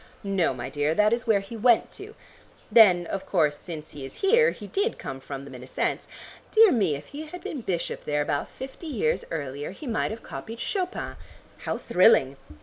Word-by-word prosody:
"No, 195 -3 +1
my 125 -1 -5
dear, 145 +3 0
that 210 +3 +4
is 240 +1 -2
where 210 -3 +4
he 195 +4 -9
went 230 +1 +3
to; 425 +3 -10 0.6
then 195 -6 +7
of 190 +3 -5
course 150 -2 +2
since 155 -3 -8
he 145 -2 -9
is 135 - -9
here 465 +4 +5
he 210 - -8
did 405 - -1
come 135 0 -6
from 135 0 -7
them 140 - -11
in 125 - -9
a 125 - -10
sense. - - -2 0.4
Dear 440 -2 +7
me, 195 - +2
if 140 - -8
he 305 +2 -7
had 355 +3 -9
been 280 - -5
bishop 180 -6 -3
there 150 0 +1
about 145 -1 -2
fifty 270 +5 -9
years 465 - 0
earlier, 145 -2 -4
he 195 - -10
might 230 -4 0
have 220 +2 -7
copied 225 +1 -8
Chopin. 370 -2 -3 0.5
How - - -1
thrilling!" 140 - +4
195 Hz, 205 wpm, -26 LUFS, -, 0.6 s, then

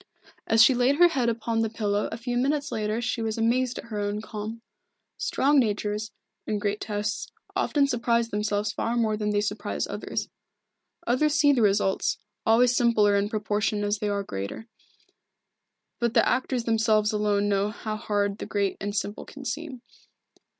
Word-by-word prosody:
As 225 0 +6
she 265 - +6
laid 250 +3 +3
her 350 +3 +6
head 255 -7 +1
upon 230 0 -1
the 225 -1 +1
pillow 210 -2 -1
a - - -4
few 245 +1 -3
minutes 285 +3 0
later 215 +2 -1
she 245 0 -1
was 220 0 -2
amazed 245 +2 +1
at - - -6
her 220 -3 -5
own 205 0 -2
calm. 220 +1 -6 0.6
Strong 285 +1 +3
natures, 210 -2 -1 0.4
in 215 - 0
great 205 0 -2
tests, 210 0 -3 0.3
often 285 -2 +2
surprise 235 -3 +1
themselves 205 -1 -1
far 230 +3 -2
more 220 -2 +1
than 210 0 -2
they 205 0 +1
surprise 210 - -2
others. - - -4 0.8
Others 290 +5 +2
see 295 -2 +5
the 250 - +2
results, 200 -2 +2 0.3
always 240 +2 +5
simpler 220 -4 +4
in 200 +1 +1
proportion 210 -1 -1
as 205 0 0
they 210 -2 -1
are 200 0 -1
greater. 100 - -6 1.3
But 235 -2 0
the - - +5
actors 255 -1 0
themselves 220 -2 +2
alone 205 -1 +1
know 200 0 +1
how 215 0 -5
hard 205 -2 -1
the - - -5
great 200 -2 -1
and 205 +1 -3
simple 205 0 -3
can 275 -1 -11
seem. 265 -1 -5
220 Hz, 170 wpm, -26 LUFS, 205-240 Hz, 1.3 s, As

